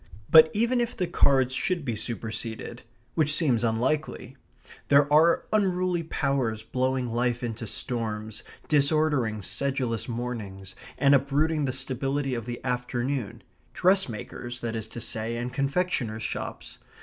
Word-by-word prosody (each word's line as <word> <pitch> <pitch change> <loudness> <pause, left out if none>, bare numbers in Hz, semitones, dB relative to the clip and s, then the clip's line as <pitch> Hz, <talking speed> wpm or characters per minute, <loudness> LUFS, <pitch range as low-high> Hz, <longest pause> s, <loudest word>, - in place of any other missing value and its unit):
But, 160 0 +9
even 235 +3 +1
if 240 0 -3
the 185 - +1
cards 135 -6 +3
should 170 +3 -1
be 120 -4 -1
superseded, 115 +1 -4 0.3
which 155 -2 +2
seems 130 -9 +2
unlikely, 125 +3 -1 0.5
there 140 0 +6
are 160 +3 +5
unruly 185 -4 +1
powers 135 -8 -1
blowing 130 +1 -1
life 120 +1 0
into 115 -1 -4
storms, 110 -2 -3 0.3
disordering 140 -7 +2
sedulous 125 +3 -2
mornings, 110 -6 -5 0.2
and 140 +1 +4
uprooting 145 +3 +2
the 130 - 0
stability 135 +1 -2
of 115 -1 -4
the 120 +1 -6
afternoon 125 -1 -2 0.3
dressmakers, 125 - 0
that 115 -1 -3
is 110 -1 -4
to 120 - -8
say, 115 +1 -3
and 120 +1 -4
confectioners' 135 -6 -1
shops. - - -5
130 Hz, 130 wpm, -27 LUFS, 115-150 Hz, 0.5 s, But